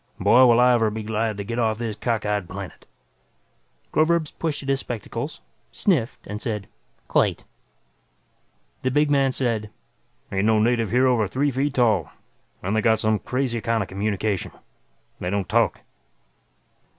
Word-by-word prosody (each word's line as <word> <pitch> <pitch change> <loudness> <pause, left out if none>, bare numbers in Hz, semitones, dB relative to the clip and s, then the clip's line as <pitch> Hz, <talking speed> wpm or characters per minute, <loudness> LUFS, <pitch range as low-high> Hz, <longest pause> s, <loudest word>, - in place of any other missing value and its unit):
"Boy, 125 +2 +6
will 120 0 +5
I 125 0 +6
ever 115 -2 +3
be 110 +1 -5
glad 110 0 -1
to 100 - -4
get 115 +4 -4
off 110 -2 +1
this 115 -2 -3
cockeyed 105 -4 -1
planet." 95 -2 -8 1.1
Groverzb 155 0 +2
pushed 155 -3 -2
at 135 - -5
his 135 0 +2
spectacles, 120 -5 -5 0.3
sniffed, 145 - 0
and 105 +1 -6
said, 105 -4 -3 0.4
"Quite." - - +1 1.4
The 130 - 0
big 145 +2 +2
man 135 -2 +3
said, 115 -5 -1 0.6
"Ain't 95 +1 0
no 110 0 +4
native 115 0 +2
here 125 +5 +3
over 120 -5 +3
three 140 +7 0
feet 135 +2 -1
tall. 110 - +2 0.5
And 95 +4 -1
they 110 - +2
got 110 0 +3
some 110 -1 +1
crazy 125 -3 -2
kind 115 0 0
of - - -10
communication. 100 0 -2 0.7
They 90 - -3
don't 100 -1 -1
talk." - - +1
115 Hz, 155 wpm, -23 LUFS, 105-130 Hz, 1.4 s, Boy